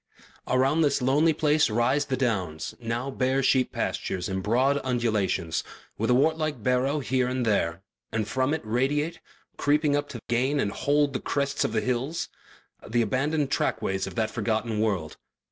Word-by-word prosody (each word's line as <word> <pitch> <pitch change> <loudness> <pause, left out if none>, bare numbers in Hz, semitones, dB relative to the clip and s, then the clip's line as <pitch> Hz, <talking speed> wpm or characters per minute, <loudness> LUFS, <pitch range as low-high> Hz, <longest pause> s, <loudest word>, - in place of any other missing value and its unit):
Around 135 +5 +2
this 145 -3 +2
lonely 140 +6 +3
place 150 -2 +2
rise 120 +6 +2
the 135 -2 -2
Downs, 95 -11 -1
now 120 +3 -3
bare 130 +1 +1
sheep 130 -1 +3
pastures, 90 -2 -2
in 95 -1 -2
broad 130 +7 +2
undulations, 110 -9 0 0.3
with 115 +2 -1
a 125 - +5
wart 160 +5 +3
like 150 -7 -2
barrow 130 +4 +1
here 130 -1 +1
and 125 -1 -1
there, 95 -4 0 0.3
and 110 -1 -1
from 130 +3 0
it 160 - -6
radiate, 140 +8 0 0.4
creeping 145 0 +2
up 145 0 -1
to 120 - -6
gain 130 +5 +1
and 100 - 0
hold 145 +4 +1
the 130 - -1
crests 140 0 -1
of - - -1
the 110 -1 0
hills, 130 +6 -2 0.6
the 120 +1 +2
abandoned 140 +5 0
trackways 95 -6 0
of - - -8
that 110 -2 0
forgotten 110 -1 -1
world. 100 -8 -1
130 Hz, 170 wpm, -26 LUFS, 110-145 Hz, 0.6 s, a